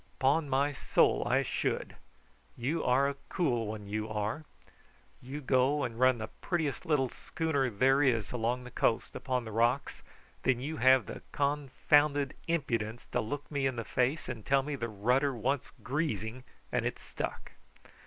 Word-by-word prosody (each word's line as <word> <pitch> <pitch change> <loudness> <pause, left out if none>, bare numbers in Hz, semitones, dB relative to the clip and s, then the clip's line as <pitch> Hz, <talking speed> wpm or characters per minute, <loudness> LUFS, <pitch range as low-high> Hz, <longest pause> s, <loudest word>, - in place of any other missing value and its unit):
'Pon 140 +3 +2
my 140 +2 +2
soul 140 - +2
I - - +3
should. - - -2 0.6
You 145 +7 -1
are 130 +3 +3
a 140 0 -3
cool 120 - 0
one, 105 -1 -5
you 110 +1 -3
are. 110 +8 -2 0.8
You 135 +4 -6
go 130 +2 +2
and 115 0 -4
run 130 -1 +5
the 110 -1 -4
prettiest 160 -6 -1
little 140 -5 +2
schooner 145 -4 -1
there 130 +6 +3
is 120 -6 +2
along 125 +1 -1
the 125 - -10
coast 115 - 0
upon 125 -2 -2
the 110 - -6
rocks, 120 +5 +1 0.4
and 130 - +4
then - - -9
you 150 +5 -4
have 130 0 +5
the - - -7
confounded 145 0 +2
impudence 120 -9 -1
to - - +1
look 145 +7 -5
me 140 -2 +1
in 130 - -2
the 115 - -3
face 130 +8 0
and 120 -4 -5
tell 135 +3 +3
me 145 +1 -3
the 115 -3 -3
rudder 125 +7 +1
wants 130 +4 -1
greasing 130 - -2 0.3
and - - +1
it - - -2
stuck." - - -6
130 Hz, 170 wpm, -31 LUFS, 115-145 Hz, 0.8 s, run